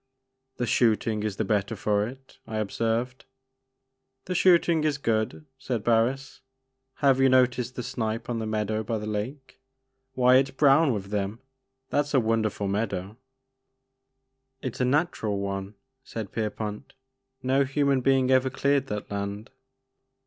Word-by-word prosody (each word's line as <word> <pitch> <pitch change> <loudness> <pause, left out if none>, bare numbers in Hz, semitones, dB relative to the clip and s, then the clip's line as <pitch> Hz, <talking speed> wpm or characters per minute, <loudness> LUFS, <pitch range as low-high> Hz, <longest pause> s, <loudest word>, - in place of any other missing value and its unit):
" 130 0 -52
The 120 - -1
shooting 110 -2 +2
is 105 -2 -2
the 110 - 0
better 105 +2 0
for 105 +1 0
it," 130 +2 -13
I 110 - -4
observed. 115 +4 -2 1.0
"The 185 - -3
shooting 170 -3 +4
is 150 -2 +1
good," 115 +2 -1
said 120 -6 -3
Barris, 120 +4 +1 0.6
"have 135 -1 +5
you 135 0 +5
noticed 125 -1 +2
the 125 - -4
snipe 115 -2 -3
on 120 -2 -2
the 110 - -3
meadow 110 0 -1
by 115 +1 -2
the 105 - -5
lake? 115 +8 -5 0.5
Why 125 0 +5
it 135 0 +3
*s - - -16
brown 140 +1 +5
with 100 -3 -4
them 105 +2 -2 0.5
I - - 0
That 145 0 +2
's 145 - -3
a - - +6
wonderful 110 -3 0
meadow." 100 -1 -2 1.5
It 130 - -3
*s - - -6
a - - +3
natural 130 - 0
one," 100 +1 -4 0.3
said 110 -7 -6
Pierpont, 105 +2 -4 0.5
"no 135 +2 +3
human 140 -1 +1
being 130 0 +3
ever 130 0 +4
cleared 140 +1 +1
that 105 -3 -5
land." 100 +3 -4
115 Hz, 155 wpm, -26 LUFS, 105-135 Hz, 1.5 s, a